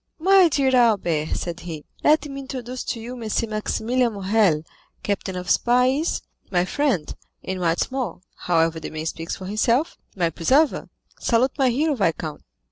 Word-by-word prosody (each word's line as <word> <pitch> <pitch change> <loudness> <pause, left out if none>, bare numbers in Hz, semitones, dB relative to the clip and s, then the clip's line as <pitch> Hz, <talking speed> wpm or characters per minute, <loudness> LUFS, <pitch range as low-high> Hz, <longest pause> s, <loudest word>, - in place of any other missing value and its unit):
"My 380 +2 +6
dear 270 -3 +2
Albert," 190 -10 +2
said 175 0 -4
he, 160 -4 -7 0.2
"let 305 0 +4
me 275 -1 -6
introduce 255 -2 -6
to 230 - -3
you 235 +3 -7
M. 220 - -4 0.2
Maximilian 230 +3 0
Morrel, 195 -5 +2 0.4
captain 200 -2 -2
of 180 0 -5
Spahis, 255 - +2 0.3
my 180 -2 +2
friend; 240 - 0 0.3
and 190 0 -4
what 170 -1 +1
is - - -1
more—however 175 -8 -1
the 155 - -6
man 155 0 -5
speaks 165 +1 -4
for 190 - -9
himself—my 215 - 0
preserver. 275 - +2 0.3
Salute 250 +3 +2
my 265 -2 +4
hero, 295 +6 +1
viscount." 165 - -1
220 Hz, 150 wpm, -23 LUFS, 175-260 Hz, 0.4 s, My